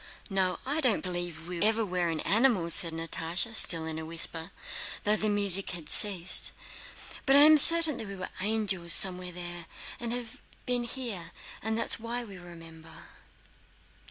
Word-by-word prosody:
"No, 185 -2 -1
I 290 +4 -3
don't 250 -7 -1
believe 175 -3 -6
we 175 -1 -8
ever 220 +1 0
were 180 -2 -3
in 160 -2 -4
animals," 210 -7 0
said 170 - +1
Natásha, 165 +6 -4
still 165 -6 +2
in 160 0 -6
a - - -8
whisper 165 0 -4 0.5
though 210 -1 +1
the 215 0 -3
music 200 -2 +4
had 170 -4 -7
ceased. 185 -4 +1 0.7
"But 270 - +3
I 285 - +7
am 310 +1 +6
certain 325 -1 +8
that 220 - -8
we 200 - -9
were 185 -1 -8
angels 195 -5 -1
somewhere 180 -1 +4
there, 175 -1 -8 0.3
and 235 -1 -5
have 245 -1 -7 0.2
been 245 -1 -2
here, 225 -9 -7 0.3
and 220 +1 -3
that 230 - -2
is - - +2
why 235 +2 -6
we 200 -5 -13
remember...." 165 -2 -15
190 Hz, 170 wpm, -27 LUFS, 170-225 Hz, 0.7 s, certain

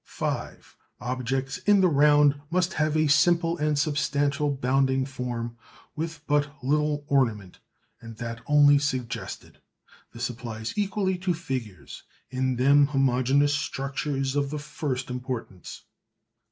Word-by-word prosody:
(5) - - -5 0.2
Objects 130 +4 -3
in 200 +1 +4
the 185 - +5
round 145 -2 +4
must 180 +1 0
have 155 0 0
a 155 - +3
simple 170 +2 +3
and 150 -1 +1
substantial 145 -1 0
bounding 135 0 +1
form 120 -3 -5 0.4
with 160 -1 -5
but 145 -1 +1
little 150 +1 0
ornament, 115 - 0 0.4
and 115 -1 -10
that 115 0 -6
only 145 -1 +6
suggested. 130 -5 -4 0.5
This 120 +1 -3
applies 115 -2 -6
equally 195 -2 -1
to 180 -1 0
figures. 120 - -6 0.3
In 130 0 0
them 140 +3 +5
homogeneous 135 +1 +2
structure 140 0 -3
is 135 0 -1
of 140 -1 0
the 150 - -4
first 145 -4 -4
importance. 125 -7 -6
140 Hz, 125 wpm, -26 LUFS, 125-150 Hz, 0.5 s, only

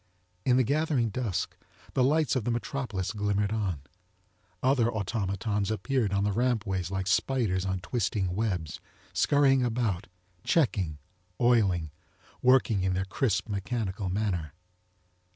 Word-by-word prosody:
In 125 -1 +4
the 130 - +4
gathering 145 -3 +1
dusk 100 -6 -2 0.4
the 130 - +3
lites 150 +2 +2
of 130 - 0
the 120 - -1
metropolis 120 -5 -2
glimmered 105 -1 0
on. 100 -9 -1 0.8
Other 130 -3 +3
automatons 100 -1 -1
appeared 110 +1 0
on 100 0 +1
the 105 - +1
rampways 105 -6 0
like 95 -1 -2
spiders 95 0 +1
on 95 -1 -2
twisting 95 -1 -1
webs, 90 -8 -2 0.3
scurrying 135 -2 +4
about, 110 -5 -1 0.4
checking, 95 - +1 0.4
oiling, 100 -10 +3 0.5
working 125 -6 +4
in 95 0 +1
their 95 +1 -1
crisp 105 +2 0
mechanical 100 -2 -2
manner. 90 -7 -1
105 Hz, 125 wpm, -28 LUFS, 95-125 Hz, 0.8 s, In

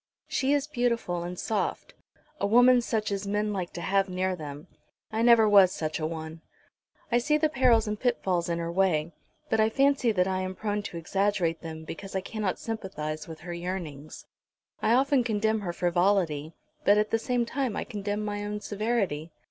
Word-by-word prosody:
She 270 0 0
is 290 -1 +2
beautiful 240 - -1
and 175 +1 -5
soft, 215 +3 -2 0.5
a 200 - +1
woman 245 +3 +6
such 220 -3 -1
as 200 0 -3
men 210 +1 0
like 185 -3 -3
to 175 - -6
have 195 +1 +1
near 185 0 -1
them. 150 -1 -8 0.5
I 220 +1 -1
never 235 -2 +6
was 200 -3 +7
such 155 -2 -3
a 155 - -1
one. 160 0 -7 0.7
I 240 - +4
see 300 +5 +2
the 310 0 +2
perils 245 -6 +3
and 210 0 -3
pitfalls 190 -8 0
in 170 - 0
her 170 0 -3
way; 170 -3 +1 0.4
but 220 - +2
I 220 0 +4
fancy 275 -1 +3
that 185 -3 +2
I 190 -1 0
am 185 0 -3
prone 210 0 -2
to 200 -4 -7
exaggerate 180 -1 0
them, 160 -1 -7
because 195 +5 -8
I 190 - 0
cannot 210 -1 -3
sympathise 155 -9 -5
with 160 -1 -9
her 175 +1 -6
yearnings. 170 -5 -6 0.6
I 225 - +3
often 270 0 +3
condemn 220 -1 +1
her 180 -4 -3
frivolity, 175 -3 +1 0.3
but 205 -5 +5
at 210 0 +1
the 225 - +2
same 245 0 0
time 255 -2 -2
I - - -2
condemn 205 -1 -3
my 205 0 -3
own 210 0 -3
severity. 205 -8 -1
200 Hz, 190 wpm, -28 LUFS, 175-225 Hz, 0.7 s, was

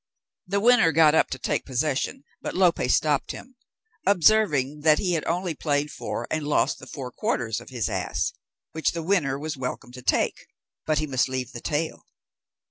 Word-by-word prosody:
The 200 +2 0
winner 225 -6 +5
got 155 0 +5
up - - +3
to - - -4
take 125 - -1
possession, 135 +1 -1 0.2
but - - -5
Lope 180 -2 +3
stopped 150 -3 +2
him, 255 +1 -11 0.5
observing 170 -8 +3
that 155 0 +4
he 180 -3 0
had 160 - 0
only 175 0 -1
played 145 -1 -1
for - - -5
and 155 -2 -1
lost 150 - +1
the - - -11
four 130 -3 -7
quarters 115 -2 -2
of - - -13
his 120 -6 -2
ass, - - -2 0.4
which 160 - 0
the 165 -1 -4
winner 155 -7 +1
was 150 0 -5
welcome 125 -1 -5
to 125 0 -10
take, - - 0 0.4
but 155 -1 +2
he 155 - +1
must 130 -3 0
leave 130 -2 -3
him - - -17
the 120 - -7
tail. 155 +2 -3
150 Hz, 190 wpm, -25 LUFS, 135-170 Hz, 0.5 s, winner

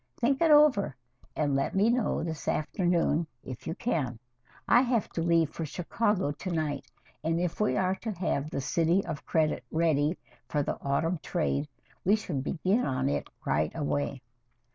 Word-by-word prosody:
Think 270 +4 +1
it 330 - +5
over, 295 - +5 0.4
and 145 -3 +1
let 135 +6 0
me 205 +4 +4
know 245 -8 0
this 160 -2 -5
afternoon 170 -1 +1 0.2
if 130 -2 -8
you 165 - -2
can. 150 - -1 0.5
I 240 - +6
have 245 -4 +1
to 165 - -3
leave 165 -2 +3
for 165 - -5
Chicago 185 +2 0
to 150 +6 -6
night, 155 -3 -2 0.4
and 165 +1 +1
if 175 -1 -2
we 210 - +2
are 185 -1 +2
to 225 - -4
have 155 -5 -1
'The 140 - -3
City 170 +7 +2
of 145 - -6
Credit' 155 -5 +1
ready 160 0 +2 0.3
for 145 -1 +1
the - - -3
autumn 160 +5 0
trade, 150 -3 -1 0.4
we 200 +4 +5
should 165 -11 -3
begin 185 - +1
work - - 0
on 130 0 0
it - - -2 0.2
right 75 0 +1
away." 145 -3 -2
165 Hz, 175 wpm, -29 LUFS, 145-195 Hz, 0.5 s, I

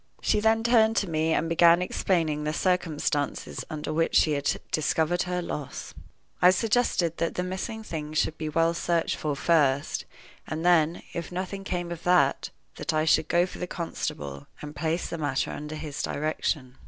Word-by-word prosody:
She 210 - +1
then 220 +1 +3
turned 225 -2 +4
to 200 - +1
me, 160 -1 0
and 160 0 +1
began 170 +1 +5
explaining 165 -4 0
the 150 0 -1
circumstances 155 -5 -1
under 155 -1 -4
which 165 +1 +1
she 155 - +5
had 145 -1 0
discovered 160 +3 +1
her 180 0 -1
loss. 150 -4 -6 0.5
I 180 - +8
suggested 185 -4 +1
that 165 - -1
the 180 - -1
missing 190 +5 -4
things 155 -5 -5
should 155 - +1
be 155 -1 -4
well 165 +2 +2
searched 170 0 0
for 150 -2 -2
first, 145 -2 +1 0.4
and 160 +2 -4
then, 170 -1 +3
if 170 0 -5
nothing 190 +2 -4
came 175 -2 -3
of 170 -1 -6
that, 180 0 +3 0.3
that 160 - -2
I 155 0 +2
should 160 -1 +3
go 175 +2 +3
for 180 - -10
the 180 - -3
constable, 70 - -5
and 150 0 -8
place 160 +3 -1
the 165 - -5
matter 145 -3 -1
under 150 +1 -6
his 150 -2 -5
direction. 145 -3 -2
165 Hz, 180 wpm, -27 LUFS, 150-180 Hz, 0.5 s, I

